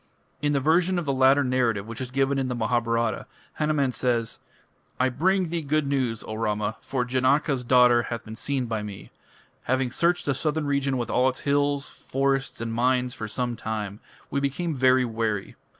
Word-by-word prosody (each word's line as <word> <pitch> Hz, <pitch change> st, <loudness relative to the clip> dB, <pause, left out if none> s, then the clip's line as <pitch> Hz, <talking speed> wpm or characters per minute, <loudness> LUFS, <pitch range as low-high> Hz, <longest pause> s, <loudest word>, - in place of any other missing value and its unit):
In 145 Hz, 0 st, +1 dB
the 140 Hz, -, +2 dB
version 170 Hz, +6 st, +2 dB
of 175 Hz, -, -2 dB
the 140 Hz, -, 0 dB
latter 135 Hz, +2 st, +5 dB
narrative 120 Hz, -6 st, +1 dB
which 115 Hz, +2 st, -7 dB
is 130 Hz, -, -4 dB
given 135 Hz, +1 st, +1 dB
in 130 Hz, -, -1 dB
the 125 Hz, -, -2 dB
Mahabharata, 115 Hz, -1 st, 0 dB, 0.3 s
Hanuman 150 Hz, -3 st, +1 dB
says: 120 Hz, -3 st, -1 dB, 0.6 s
"I 130 Hz, +1 st, +3 dB
bring 180 Hz, +7 st, +1 dB
thee 170 Hz, 0 st, -2 dB
good 155 Hz, 0 st, 0 dB
news, 130 Hz, -5 st, -1 dB
O -, -, -6 dB
Rama; 105 Hz, 0 st, -1 dB
for 125 Hz, -2 st, -2 dB
Janaka's 130 Hz, +2 st, +1 dB
daughter 125 Hz, -1 st, +5 dB
hath 120 Hz, 0 st, -5 dB
been 110 Hz, 0 st, -8 dB
seen 135 Hz, +2 st, -2 dB
by 110 Hz, -2 st, -2 dB
me. 105 Hz, -2 st, -8 dB, 0.5 s
Having 130 Hz, 0 st, 0 dB
searched 175 Hz, +5 st, +1 dB
the 140 Hz, -, +1 dB
southern 155 Hz, +2 st, -1 dB
region 140 Hz, -1 st, 0 dB
with 120 Hz, -2 st, -3 dB
all 130 Hz, +1 st, +3 dB
its 130 Hz, -, -6 dB
hills, 145 Hz, 0 st, +1 dB
forests, 135 Hz, 0 st, -2 dB
and 115 Hz, -1 st, -3 dB
mines 125 Hz, +1 st, +1 dB
for 110 Hz, -, -5 dB
some 120 Hz, +2 st, -2 dB
time, 105 Hz, -2 st, -4 dB, 0.3 s
we 140 Hz, -, +1 dB
became 140 Hz, +5 st, -1 dB
very 130 Hz, 0 st, +4 dB
weary. 110 Hz, -3 st, -2 dB
130 Hz, 185 wpm, -25 LUFS, 115-140 Hz, 0.6 s, latter